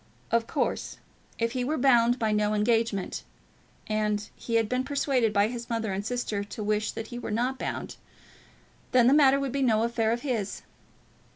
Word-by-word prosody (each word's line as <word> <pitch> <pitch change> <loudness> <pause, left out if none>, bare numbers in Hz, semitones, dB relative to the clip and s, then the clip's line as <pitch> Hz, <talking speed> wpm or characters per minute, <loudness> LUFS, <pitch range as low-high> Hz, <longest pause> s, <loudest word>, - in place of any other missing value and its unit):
Of 230 0 +2
course, - - -2 0.4
if 230 0 0
he 255 0 -2
were 300 +5 -1
bound 240 -2 +4
by 220 -3 0
no 210 0 +1
engagement, 225 -2 0 0.6
and 210 -1 -1
he 230 - -4
had 225 -1 +3
been 250 +3 0
persuaded 270 -4 +1
by 205 0 +3
his 235 0 -6
mother 225 -3 -1
and 195 +1 -3
sister 220 -3 -2
to 210 +1 -7
wish 210 +1 0
that 225 0 -6
he 240 - -6
were - - -5
not 245 +5 -1
bound, - - -4 1.0
then 250 -2 +6
the 255 - +6
matter 275 -2 +5
would 275 -2 -2
be 275 +1 -1
no 225 -4 +3
affair 230 -1 +1
of 235 +1 -1
his. 230 -8 -2
230 Hz, 185 wpm, -27 LUFS, 215-250 Hz, 1.0 s, then